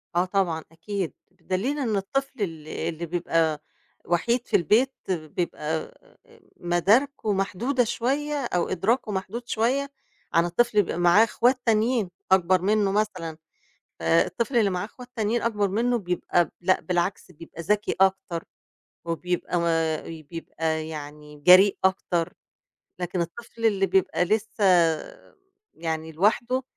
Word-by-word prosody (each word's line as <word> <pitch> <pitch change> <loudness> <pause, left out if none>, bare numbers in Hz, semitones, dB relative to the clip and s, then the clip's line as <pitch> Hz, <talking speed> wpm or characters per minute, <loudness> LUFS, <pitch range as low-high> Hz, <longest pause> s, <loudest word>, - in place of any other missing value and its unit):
آه 175 +1 +3
طبعًا 180 -4 0
أكيد، 185 +1 -4 0.2
بدليل 200 +11 -2
إن 225 -6 0
الطفل 265 +5 -2
ال 160 -5 -4
اللي 165 +1 -4
بيبقى 165 -2 0 0.4
وحيد 235 +8 0
في - - 0
البيت 225 - +3 0.2
بيبقى 170 -1 -3 0.2
آآ - - -19 0.4
مداركه 210 +7 +2
محدودة 235 +7 0
شوية، 275 +6 -1
أو 175 -6 -1
إدراكه 210 +5 0
محدود 210 +5 -4
شوية 265 +6 0 0.4
عن 165 +1 +4
الطفل 235 +8 +1
بيبقى 170 - -4
معاه 175 +5 +6
إخوات 245 +2 +2
تانيين، 225 -2 +2 0.2
أكبّر 185 -1 +4
منّه 205 0 +2
مثلًا 185 -7 -2 0.6
فالطفل 85 - +1
اللي 210 -4 +4
معاه 180 +2 -2
إخوات 245 +3 -11
تانيين 225 +2 0
أكبر 210 -3 +1
منّه 235 +4 +1
بيبقى 180 -2 0
لأ 185 +2 +2
بالعكس 180 +1 -2
بيبقى 165 0 -10
ذكي 210 +4 0
أكتر، 190 -3 +1 0.6
وبيبقى 175 +1 -2
ما 165 -2 +1
وبيبقى 160 0 -4
يعني 150 -1 -9
جريء 185 +5 +7
أكتر، 180 -3 +1 0.7
لكن 180 0 -2
الطفل 225 +6 -4
اللي 195 -3 +2
بيبقى 190 -2 +2
لسّه 215 +2 -1 1.1
يعني 160 -1 -4
لوحده، 235 +9 +1
190 Hz, 125 wpm, -25 LUFS, 170-225 Hz, 1.1 s, جريء